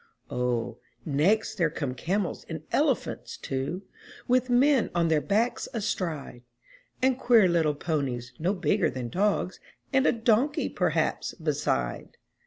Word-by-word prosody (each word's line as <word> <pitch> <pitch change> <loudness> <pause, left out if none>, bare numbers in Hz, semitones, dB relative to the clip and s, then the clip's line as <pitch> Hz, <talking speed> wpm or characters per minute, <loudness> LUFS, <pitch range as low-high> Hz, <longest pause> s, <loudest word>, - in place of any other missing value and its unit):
O, 120 -1 -1 0.3
next 200 +9 +1
there 165 -2 +3
come 145 -4 -3
camels 185 +7 -2
and - - -5
elephants, - - 0
too, 135 +8 -3 0.4
With 255 0 +2
men 260 0 +4
on 170 -1 +2
their 155 -2 +3
backs 220 +7 0
astride. 165 - -3 0.6
And 260 -1 +3
queer 230 -5 +5
little 165 -4 +2
ponies, 140 -6 -2
no 180 +6 +1
bigger 180 +2 +1
than 125 -2 -5
dogs, 190 - 0 0.3
And 270 +1 +4
a - - +6
donkey 235 +5 +1
perhaps - - 0
beside! - - -2
180 Hz, 130 wpm, -27 LUFS, 145-225 Hz, 0.6 s, a